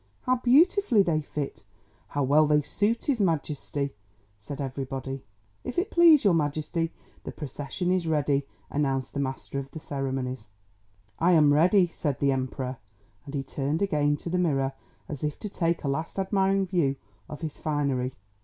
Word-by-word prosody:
"How 255 0 +2
beautifully 265 - +4
they 160 -4 +1
fit! 145 -5 -5 0.4
How 145 - -1
well 150 +3 +4
they 150 0 +3
suit 205 +10 0
his 260 -7 +1
Majesty!" 145 -5 -1 0.5
said 140 +8 -8
everybody. 135 0 -4 0.4
"If 250 - -6
it 360 - 0
please 335 -4 +7
your 200 -4 +5
Majesty, 160 +2 0 0.3
the - - -5
procession 150 +5 -3
is 185 -3 +1
ready," 145 -3 +1 0.2
announced 135 -3 -1
the 140 - -3
Master 135 0 -3
of 135 0 -7
the 160 - -8
Ceremonies. 130 -5 -3 0.7
"I 175 +2 +4
am 150 -3 +6
ready," 180 +5 +5
said 150 -5 -3
the 140 -1 +3
Emperor. 130 -1 -3 0.5
And 145 0 -7
he 135 - -1
turned 145 +6 -1
again 145 -6 +2
to 170 - -6
the 180 - +1
mirror 135 -6 +1 0.3
as 150 -2 -6
if 150 -1 -1
to 210 - -6
take 170 -3 -1
a - - -1
last 160 +7 -2
admiring 195 0 +2
view 170 -7 +1 0.3
of 150 - -8
his 155 -3 -5
finery. 140 -4 -1
150 Hz, 165 wpm, -27 LUFS, 135-180 Hz, 0.7 s, please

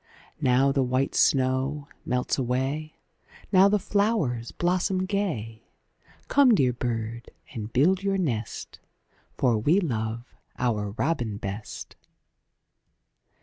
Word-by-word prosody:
Now 130 +2 +4
the 135 - +1
white 130 +1 0
snow 135 +2 +1 0.2
melts 125 +2 0
away; 135 +5 -2 0.6
Now 195 0 +6
the 210 - +3
flowers 200 - 0
blossom 185 +1 0
gay: 120 - -3 0.6
Come 270 -5 +5
dear 130 -8 +2
bird 115 -1 -4 0.2
and 110 -1 -6
build 180 +10 +3
your 195 0 0
nest, 120 - -3 0.6
For 120 -4 +2
we 155 - +3
love 115 - -3 0.2
our 105 -5 -1
robin 120 -9 -1
best. 100 +2 -7
130 Hz, 105 wpm, -26 LUFS, 115-180 Hz, 0.6 s, Now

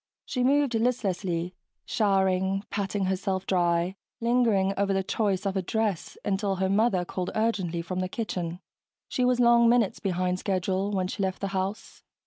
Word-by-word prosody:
She 250 - -1
moved 280 0 +3
listlessly, 190 -7 -1 0.3
showering 195 -2 +1
patting 200 -1 -1
herself 190 0 -1
dry, 175 0 +1 0.2
lingering 230 -5 +2
over 200 0 +1
the 195 0 +1
choice 200 -1 0
of 195 0 -1
a 190 - +1
dress 210 -1 -2
until 195 0 0
her 190 0 0
mother 195 -3 +2
called 180 0 -3
urgently 190 -7 0
from 185 +2 -4
the 185 0 -2
kitchen. 180 -5 -4 0.5
She 250 - 0
was 250 0 +3
long 235 -1 +6
minutes 235 -4 +2
behind 185 -2 -1
schedule 190 0 -1
when 190 -3 0
she 190 - -4
left 190 -1 -1
the 195 - -2
house. 195 +2 -4
195 Hz, 160 wpm, -27 LUFS, 185-220 Hz, 0.5 s, long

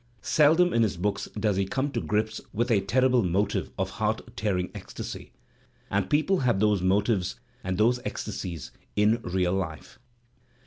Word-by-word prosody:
Seldom 160 +4 +4
in 115 - +3
his 105 -5 +1
books 100 +2 -2
does 105 -2 +1
he 100 - +1
come 135 +6 -1
to 115 - -2
grips 110 +1 -1
with 120 +3 0
a 105 -4 +4
terrible 125 +4 +3
motive^X 95 +2 0
or - - +1
heart - - -3
tearing 95 -3 -1
ecstasy - - -7 0.3
— - - -33
and 100 -1 0
people 155 +6 +2
have 120 -6 +2
those 105 -2 +3
motives 100 +1 +1 0.2
and 95 -1 -2
those 120 +4 +3
ecstasies 85 - -5 0.2
in 105 +2 +3
real 90 -2 0
life. 90 -5 -4
105 Hz, 165 wpm, -27 LUFS, 95-120 Hz, 0.3 s, Seldom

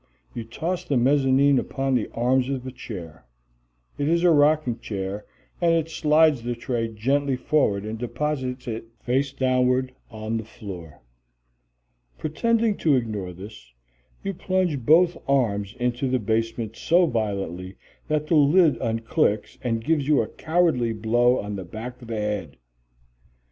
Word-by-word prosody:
You 115 -2 -5
toss 165 +10 -3
the 140 - 0
mezzanine 135 +1 +4
upon 135 0 -2
the 120 -4 0
arms 125 +2 +1
of 130 -2 -3
a 130 - -5
chair. 90 - -9 0.8
It 145 - 0
is 170 +1 +2
a 175 - +6
rocking 145 -5 +3
chair, 100 -1 -5 0.3
and 170 -1 +4
it 165 -1 0
slides 155 -3 +3
the 120 +1 -3
tray 120 -1 -2
gently 135 +5 0
forward 125 -7 +1
and 110 +1 -5
deposits 130 +1 -3
it 115 -1 -4 0.2
face 135 +3 0
downward 130 -1 +1 0.2
on 110 0 -4
the 110 - -4
floor. 90 - -10 1.1
Pretending 225 +7 +1
to 150 -4 +3
ignore 105 -7 -2
this, 90 - -12 0.5
you 195 - -2
plunge 185 -5 0
both 170 +6 +5
arms 105 -7 +1
into 125 +2 0
the 130 - +2
basement 115 0 -2
so 175 +7 +3
violently 100 - -3 0.3
that 155 -1 0
the 160 - -1
lid 150 +3 +5
unclicks 115 -3 0
and 115 -3 -1
gives 155 -4 +1
you 150 -6 +4
a - - -6
cowardly 155 -9 +1
blow 120 +3 +2
on 105 0 -4
the 95 - -5
back 115 +7 -8
of 120 - -11
the 115 -1 -3
head. 105 - -3
125 Hz, 150 wpm, -24 LUFS, 110-145 Hz, 1.1 s, a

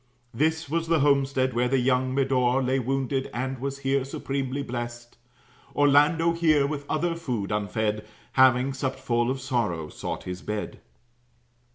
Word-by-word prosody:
This 160 +5 0
was 165 +3 -1
the 165 -2 +2
homestead 135 -2 +2
where 120 +1 +1
the 135 +2 +2
young 130 0 +1
Medore 130 -1 +2
Lay 130 +1 +1
wounded, 135 +1 -1
and 130 +1 -3
was 135 +1 -3
here 135 0 +2
supremely 135 0 -3
blest. 120 -1 -6 0.6
Orlando 150 +4 +4
here, 155 -4 +3
with 145 0 -4
other 165 +2 0
food 120 -11 -3
unfed, 105 +1 -1 0.3
Having 130 0 +4
supt 135 0 -2
full 120 -2 0
of 130 +1 -2
sorrow, 115 - -2
sought - - -5
his 90 +1 -6
bed. 105 0 -5
130 Hz, 150 wpm, -26 LUFS, 120-140 Hz, 0.6 s, Orlando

